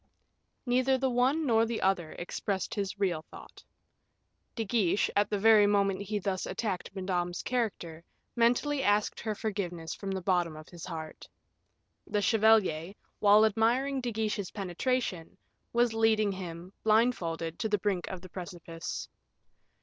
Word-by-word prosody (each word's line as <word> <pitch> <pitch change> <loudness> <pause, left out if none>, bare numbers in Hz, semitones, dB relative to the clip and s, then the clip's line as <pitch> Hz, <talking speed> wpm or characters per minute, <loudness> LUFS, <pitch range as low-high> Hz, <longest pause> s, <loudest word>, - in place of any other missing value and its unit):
Neither 255 +1 +2
the 265 0 0
one 260 +6 +2
nor 225 -4 +4
the 230 0 -2
other 185 -4 0
expressed 190 +2 -3
his 200 -1 -3
real 180 -6 0
thought. - - -13 0.9
De 225 - -2
Guiche, 205 -3 +1
at 205 0 +3
the 210 - 0
very 215 0 +6
moment 200 -1 +2
he 205 +1 -2
thus 190 -2 -2
attacked 190 -1 -3
Madame's 180 -2 -2
character, 195 -10 -2 0.3
mentally 245 +5 +2
asked 205 -3 +1
her 215 -1 -3
forgiveness 180 -7 -3
from 195 - -6
the 190 0 -2
bottom 175 -3 +1
of 155 - -12
his 170 -2 -9
heart. 160 -3 -7 0.8
The 210 - 0
chevalier, 205 -5 +3 0.2
while 210 +1 +6
admiring 245 +6 +1
De 245 -1 -2
Guiche's 210 -3 -2
penetration, 195 -2 -2 0.3
was 240 -1 +2
leading 220 -2 +3
him, 180 -1 -7
blindfolded, 180 -8 +1
to 220 - -1
the 210 - +2
brink 190 -2 -1
of 185 -2 -6
the 185 - -11
precipice. 170 -2 -6
205 Hz, 145 wpm, -30 LUFS, 180-225 Hz, 0.9 s, very